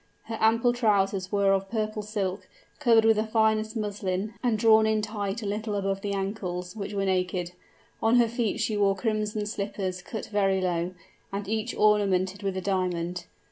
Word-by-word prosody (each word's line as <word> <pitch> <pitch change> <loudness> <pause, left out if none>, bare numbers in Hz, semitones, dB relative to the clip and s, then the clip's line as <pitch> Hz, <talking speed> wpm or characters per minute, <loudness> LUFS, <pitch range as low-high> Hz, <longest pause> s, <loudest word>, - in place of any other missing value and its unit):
Her 225 - -5
ample 230 +2 +4
trousers 200 -5 +1
were 200 -1 +3
of 195 0 -1
purple 215 -1 -2
silk, 205 -2 -3 0.3
covered 230 -5 +5
with 225 -1 +5
the 215 - +2
finest 220 0 +1
muslin, 205 -1 -2
and 240 -4 +1
drawn 220 0 +5
in 215 -1 +1
tight 210 0 -3
a - - -4
little 210 +1 -2
above 195 -1 -1
the 205 - -3
ankles, 195 -2 -3
which 205 -1 -5
were 195 0 0
naked. 180 -2 0 0.5
On 225 +2 +4
her 240 -1 +5
feet 235 -1 -1
she 215 - 0
wore 200 -1 +3
crimson 215 -1 -1
slippers 200 -3 -3
cut 215 +4 -6
very 195 -2 +1
low, 180 0 -1 0.4
and 200 0 -4
each 220 +3 -2
ornamented 200 -2 +2
with 195 -1 -2
a - - -2
diamond. 180 -2 -1
205 Hz, 180 wpm, -27 LUFS, 195-220 Hz, 0.5 s, covered